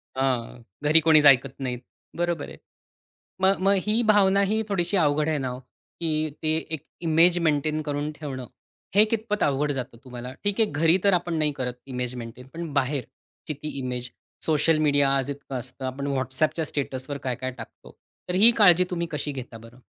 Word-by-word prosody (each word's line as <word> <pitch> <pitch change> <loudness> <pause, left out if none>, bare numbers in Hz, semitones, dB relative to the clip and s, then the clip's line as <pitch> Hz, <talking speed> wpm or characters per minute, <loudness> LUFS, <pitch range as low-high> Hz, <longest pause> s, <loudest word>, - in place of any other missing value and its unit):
अ, 130 - 0 0.6
घरी 155 +2 +6
कोणीच 155 -1 +5
ऐकत 135 -1 +5
नाही. 125 -2 -3 0.4
बरोबर 175 -3 -1
आहे. - - -11 0.8
मग 190 +1 +3
मग 200 +1 +4
ही 220 +3 +3
भावना 200 -3 +4
ही 220 0 +1
थोडीशी 190 0 0
अवघड 150 -2 +2
आहे 155 -2 0
ना 130 -2 -2
हो, 125 0 -5
की 165 +5 -8 0.3
ते 155 0 +2 0.2
एक 150 - -6 0.3
इमेज 170 +3 +5
मेंटेन 155 +1 0
करून 145 0 -3
ठेवणं. 135 -5 -7 0.5
हे 210 +2 +8
कितपत 215 -1 -2
अवघड 145 +1 +1
जातं 130 -3 -6
तुम्हाला? 125 0 -8
ठीक 205 +2 0
आहे. 220 - +5
घरी 165 +5 +3
तर 200 - +5
आपण 175 -1 -1
नाही 150 -1 +2
करत 125 -1 -3 0.2
इमेज 125 0 -3
मेंटेन, 120 +1 -9
पण 165 -3 -6
बाहेरची 140 +2 -4
ती 155 - -3
इमेज 125 -1 -4 0.4
सोशल 155 0 +2
मीडिया 145 -2 +3
आज 135 +1 -1
इतकं 140 -1 -8
असतं, 130 +2 -8
आपण 135 +2 -4
WhatsAppच्या 135 +5 -1
स्टेटसवर 140 0 -4
काय-काय 130 0 -3
टाकतो. - - -12 0.3
तर 180 - -2
ही 215 +5 +8
काळजी 180 -4 +6
तुम्ही 170 -1 -2
कशी 150 -1 -3
घेता 125 -3 -8
बरं? 115 +2 -15
150 Hz, 180 wpm, -25 LUFS, 130-170 Hz, 0.8 s, हे